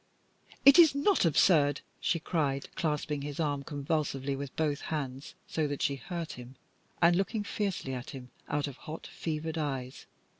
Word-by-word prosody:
"It 280 +4 +10
is 320 -5 +8
not 300 - +3
absurd," 150 -3 +4 0.2
she 165 - +1
cried, 145 -4 -1
clasping 150 -2 -1
his 145 +1 -5
arm 145 -3 0
convulsively 140 -2 -2
with 140 -1 -6
both 150 -2 0
hands 140 -3 -4
so 155 -2 -1
that 145 -1 -3
she 140 -1 +1
hurt 170 +5 -5
him, 125 +1 -10 0.5
and 170 +1 +6
looking 205 +3 0
fiercely 195 -10 -2
at 125 -1 -5
him 125 -2 -9 0.2
out 145 0 0
of 140 -2 -8
hot, 155 +1 -8
fevered 160 0 -4
eyes. 135 -4 -4
150 Hz, 160 wpm, -30 LUFS, 140-165 Hz, 0.5 s, It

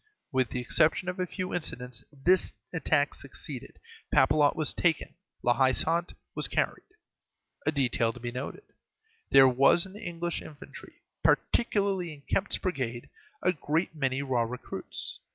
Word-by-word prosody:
With 130 -2 +1
the 125 - -3
exception 155 +8 +2
of 185 +1 -5
a 180 - 0
few 185 +1 -4
incidents 125 -8 -3
this 170 +6 +2 0.2
attack - - +2
succeeded. - - -10 0.3
Papelotte 150 -2 +4
was 155 -2 +1
taken; 170 -2 +1 0.3
La 120 - +4
Haie 130 +1 +3
Sainte 170 +4 0 0.2
was - - +1
carried. - - -1 0.8
A - - +6
detail 125 -5 +1
to 125 - -11
be 120 0 -4
noted. 130 - -6 0.7
There 135 -1 +8
was 135 +7 +4
in 190 - -12
the 210 - -10
English 170 0 -3
infantry, 150 -2 -12 0.2
particularly 195 -7 +1
in 140 - -18
Kempt's 195 +6 0
brigade, 130 - -3 0.3
a 180 - +3
great 160 +2 -1
many 135 -3 -1
raw 130 -3 +1
recruits. 190 - -5
150 Hz, 150 wpm, -29 LUFS, 130-180 Hz, 0.8 s, There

